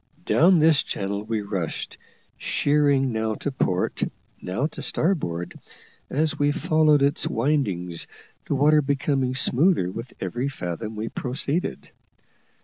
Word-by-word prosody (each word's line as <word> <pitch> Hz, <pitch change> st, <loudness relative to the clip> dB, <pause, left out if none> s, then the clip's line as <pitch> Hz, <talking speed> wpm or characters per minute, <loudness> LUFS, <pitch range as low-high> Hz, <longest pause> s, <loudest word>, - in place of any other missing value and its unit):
Down 180 Hz, +3 st, +5 dB
this 155 Hz, -1 st, +5 dB
channel 100 Hz, +1 st, -3 dB
we 110 Hz, -1 st, -2 dB
rushed, 95 Hz, -5 st, -4 dB, 0.4 s
sheering 145 Hz, -2 st, +2 dB
now 110 Hz, -1 st, -1 dB
to 145 Hz, -, -3 dB
port, 95 Hz, -8 st, -1 dB, 0.4 s
now 100 Hz, +10 st, -2 dB
to 155 Hz, -, -5 dB
starboard, 90 Hz, -, -1 dB, 0.6 s
as 155 Hz, +2 st, 0 dB
we 145 Hz, 0 st, +3 dB
followed 155 Hz, -1 st, +3 dB
its 140 Hz, +1 st, +1 dB
windings, 105 Hz, -, 0 dB, 0.4 s
the -, -, 0 dB
water 150 Hz, +2 st, +4 dB
becoming 135 Hz, -2 st, 0 dB
smoother 130 Hz, -, +3 dB
with 115 Hz, +5 st, -7 dB
every 120 Hz, +8 st, -2 dB
fathom 110 Hz, -3 st, -5 dB
we 110 Hz, +1 st, -4 dB
proceeded. 140 Hz, +6 st, -3 dB
130 Hz, 125 wpm, -24 LUFS, 105-150 Hz, 0.6 s, Down